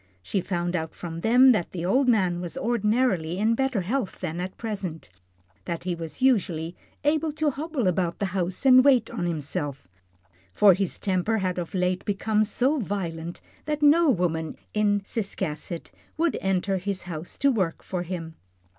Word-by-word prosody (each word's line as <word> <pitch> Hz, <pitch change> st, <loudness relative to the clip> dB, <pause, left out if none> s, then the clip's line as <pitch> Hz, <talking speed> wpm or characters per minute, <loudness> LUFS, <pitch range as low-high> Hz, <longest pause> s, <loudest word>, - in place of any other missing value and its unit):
She 190 Hz, -, -1 dB
found 175 Hz, -1 st, -2 dB
out 160 Hz, -2 st, -3 dB
from 165 Hz, -1 st, -6 dB
them 250 Hz, +5 st, +6 dB
that 210 Hz, -8 st, 0 dB
the 175 Hz, -2 st, -3 dB
old 255 Hz, +9 st, +3 dB
man 185 Hz, -7 st, +2 dB
was 175 Hz, -2 st, -6 dB
ordinarily 215 Hz, -7 st, +1 dB
in 220 Hz, +3 st, +2 dB
better 265 Hz, -3 st, 0 dB
health 215 Hz, +4 st, -2 dB
than 170 Hz, -2 st, -4 dB
at 185 Hz, +1 st, -5 dB
present, 195 Hz, -, -5 dB, 0.5 s
that 170 Hz, -1 st, -4 dB
he 180 Hz, 0 st, -1 dB
was 165 Hz, +8 st, -6 dB
usually 175 Hz, -10 st, +1 dB, 0.3 s
able 310 Hz, +1 st, +2 dB
to 305 Hz, -1 st, +1 dB
hobble 290 Hz, -3 st, -3 dB
about 180 Hz, -1 st, 0 dB
the 200 Hz, -, -1 dB
house 185 Hz, +5 st, -2 dB
and 255 Hz, -1 st, +8 dB
wait 255 Hz, -5 st, +4 dB
on 200 Hz, -7 st, -2 dB
himself, 145 Hz, -, -4 dB, 0.7 s
for 205 Hz, -2 st, +7 dB
his 190 Hz, 0 st, -2 dB
temper 195 Hz, +3 st, 0 dB
had 185 Hz, -3 st, -1 dB
of 175 Hz, +2 st, -5 dB
late 180 Hz, 0 st, 0 dB
become 210 Hz, +1 st, +1 dB
so 260 Hz, +7 st, +1 dB
violent 175 Hz, -6 st, -4 dB, 0.2 s
that 300 Hz, 0 st, -2 dB
no 315 Hz, +2 st, +6 dB
woman 165 Hz, -, 0 dB, 0.2 s
in 205 Hz, -1 st, +2 dB
Ciscasset 185 Hz, -6 st, -4 dB, 0.3 s
would 335 Hz, 0 st, +1 dB
enter 195 Hz, 0 st, 0 dB
his 190 Hz, 0 st, -3 dB
house 170 Hz, -1 st, -7 dB
to 280 Hz, 0 st, +3 dB
work 190 Hz, -9 st, -1 dB
for 180 Hz, -2 st, -3 dB
him. 170 Hz, -2 st, -5 dB
190 Hz, 170 wpm, -26 LUFS, 175-235 Hz, 0.7 s, and